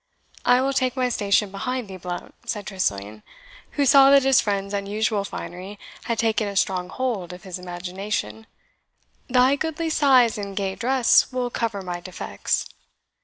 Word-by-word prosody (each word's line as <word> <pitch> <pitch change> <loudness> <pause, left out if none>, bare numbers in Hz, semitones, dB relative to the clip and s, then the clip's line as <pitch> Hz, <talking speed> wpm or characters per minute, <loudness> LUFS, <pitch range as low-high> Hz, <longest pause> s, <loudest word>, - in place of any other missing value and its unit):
"I 245 +1 +5
will 270 +1 0
take 255 -2 0
my 255 -1 +1
station 205 -3 +1
behind 250 +4 -3
thee, 190 - -8
Blount," 175 0 -6 0.2
said 210 -2 -3
Tressilian, 105 - -3 0.5
who 285 - +1
saw 275 +1 +7
that 275 -1 +6
his 270 -1 +5
friend's 200 -1 -2
unusual 205 +1 -1
finery 190 +1 -7 0.3
had 230 -2 -1
taken 220 -1 +1
a 200 - -5
strong 185 -2 0
hold 220 -8 -3
of 180 - -11
his 185 -1 -6
imagination; 180 - -5 0.8
"thy 255 +2 +4
goodly 320 +2 -2
size 255 -8 +4
and 200 -1 -6
gay 195 -1 -1
dress 250 +3 +3
will 250 -1 -2
cover 220 -5 -2
my 175 -1 -4
defects." 180 0 -3
210 Hz, 160 wpm, -23 LUFS, 185-255 Hz, 0.8 s, saw